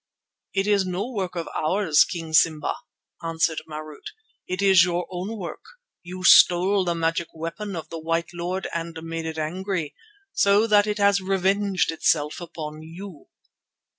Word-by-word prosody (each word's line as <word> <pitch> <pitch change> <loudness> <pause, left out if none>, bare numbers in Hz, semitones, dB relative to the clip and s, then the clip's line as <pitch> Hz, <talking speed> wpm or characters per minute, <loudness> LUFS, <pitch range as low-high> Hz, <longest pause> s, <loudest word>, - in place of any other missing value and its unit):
"It 195 0 +1
is 205 -2 +3
no 185 +4 -3
work 190 -6 -3
of 170 -1 -4
ours, 160 -1 +2
King 165 -2 -6
Simba," 155 0 +3 0.5
answered 165 -1 0
Marût. 155 -1 -8 0.4
"It 185 0 -3
is 190 -3 +6
your 175 -1 -1
own 185 +5 -5
work. 175 -6 -7 0.4
You 185 +1 -8
stole 185 +2 +6
the 170 -1 0
magic 165 0 -1
weapon 170 +5 -5
of 165 - -7
the 165 - -6
white 165 +1 -2
lord 175 +2 -3
and 165 0 -4
made 165 0 -5
it 160 0 -5
angry, 170 0 -3 0.4
so 200 +2 +4
that 210 -2 +4
it 210 0 -1
has 200 -1 +3
revenged 195 0 +1
itself 155 -1 0
upon 155 -2 -7
you." 165 0 -11
175 Hz, 155 wpm, -24 LUFS, 165-195 Hz, 0.5 s, is